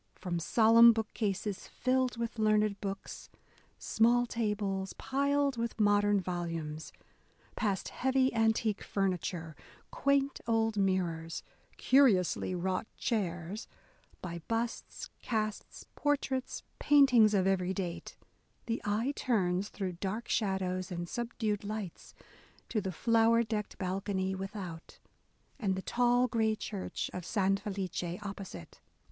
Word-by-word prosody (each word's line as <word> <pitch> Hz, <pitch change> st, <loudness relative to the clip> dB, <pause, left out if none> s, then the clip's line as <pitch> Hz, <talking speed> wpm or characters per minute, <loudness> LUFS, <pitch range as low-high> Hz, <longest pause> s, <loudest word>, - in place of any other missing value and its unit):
From 175 Hz, -3 st, -3 dB
solemn 230 Hz, +5 st, +7 dB
bookcases, 210 Hz, -2 st, -2 dB
filled 255 Hz, -1 st, 0 dB
with 235 Hz, 0 st, -4 dB
learned 215 Hz, -1 st, +2 dB
books; 195 Hz, -1 st, -6 dB, 0.5 s
small 240 Hz, +2 st, +3 dB
tables, 205 Hz, -4 st, -2 dB
piled 280 Hz, 0 st, 0 dB
with 230 Hz, 0 st, -3 dB
modern 205 Hz, -1 st, +4 dB
volumes, 165 Hz, -4 st, -4 dB, 0.3 s
— -, -, -37 dB, 0.3 s
past 200 Hz, -4 st, -1 dB
heavy 265 Hz, 0 st, +1 dB
antique 225 Hz, -2 st, +1 dB
furniture, 180 Hz, -4 st, -2 dB, 0.4 s
quaint 280 Hz, 0 st, +1 dB
old 225 Hz, -1 st, +2 dB
mirrors, 175 Hz, -5 st, -1 dB, 0.3 s
curiously 205 Hz, -9 st, +3 dB
wrought 185 Hz, +3 st, -1 dB
chairs, 190 Hz, -2 st, -2 dB, 0.3 s
— -, -, -32 dB
by 170 Hz, -2 st, -5 dB
busts, 230 Hz, +1 st, -3 dB
casts, 215 Hz, -2 st, -3 dB
por 290 Hz, 0 st, +2 dB
traits, 260 Hz, -2 st, -4 dB, 0.2 s
paintings 250 Hz, -7 st, +6 dB
of 190 Hz, -2 st, +3 dB
every 190 Hz, -1 st, +1 dB
date, 185 Hz, -3 st, -5 dB, 0.2 s
— -, -, -40 dB
the 230 Hz, 0 st, -2 dB
eye 220 Hz, +7 st, 0 dB
turns, 195 Hz, -5 st, 0 dB
through 190 Hz, -3 st, -3 dB
dark 195 Hz, +6 st, -4 dB
shadows 190 Hz, -3 st, -1 dB
and 175 Hz, 0 st, -4 dB
subdued 225 Hz, -2 st, -2 dB
lights, 205 Hz, -4 st, -6 dB, 0.5 s
to 215 Hz, -, 0 dB
the 190 Hz, -1 st, -3 dB
flower 230 Hz, +4 st, +3 dB
decked 215 Hz, -2 st, -4 dB
balcony 190 Hz, 0 st, -2 dB
without, 190 Hz, -4 st, -7 dB, 0.6 s
and 195 Hz, -4 st, 0 dB
the 190 Hz, -, -3 dB
tall 245 Hz, +1 st, +3 dB
grey 220 Hz, -2 st, +1 dB
church 205 Hz, -2 st, -4 dB
of 180 Hz, -, -5 dB
San 195 Hz, +1 st, +1 dB
Felice 185 Hz, -3 st, -4 dB
opposite. 195 Hz, -, -8 dB
205 Hz, 120 wpm, -32 LUFS, 185-230 Hz, 0.6 s, solemn